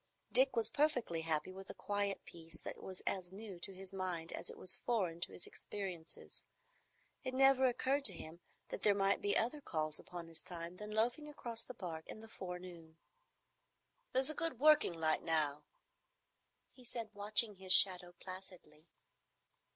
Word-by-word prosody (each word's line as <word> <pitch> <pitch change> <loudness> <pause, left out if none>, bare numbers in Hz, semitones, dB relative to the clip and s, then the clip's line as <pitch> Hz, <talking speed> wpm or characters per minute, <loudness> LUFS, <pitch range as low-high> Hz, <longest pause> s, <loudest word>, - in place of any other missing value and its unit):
Dick 265 +1 +5
was 230 -1 +2
perfectly 250 - +1
happy 160 +1 -1
with 190 +1 -10
a - - -6
quiet 205 -1 -2
peace 165 -1 -8
that - - -7
was 185 -1 -7
as 185 -2 -2
new 195 -2 -9
to 195 - -3
his 190 0 -10
mind 180 -3 -3
as - - -4
it - - -9
was 185 - +1
foreign 185 -9 0
to - - 0
his - - -7
experiences. 185 -5 -7 0.8
It 255 0 -3
never 270 0 +6
occurred 265 +3 +1
to 195 - +9
him 165 0 -8 0.3
that - - -5
there 205 -1 +4
might 195 0 +2
be 205 - +2
other 250 +7 0
calls 155 - -2
upon 175 -1 -8
his 165 -1 -1
time 170 0 -7
than 210 +1 -7
loafing 235 +8 0
across 235 -6 -3
the 250 - -8
Park 165 -6 -6
in - - -8
the 225 - -11
forenoon. 180 -5 -8 1.1
"There's 265 +3 +4
a - - -4
good 330 -6 -1
working 305 - +6
light 160 -1 +1
now," 150 -3 0 1.1
he 255 - -17
said, 230 -2 -5
watching 210 +1 +4
his 190 0 -3
shadow 180 -2 +7
placidly. 185 -4 -10
190 Hz, 170 wpm, -37 LUFS, 170-230 Hz, 1.1 s, to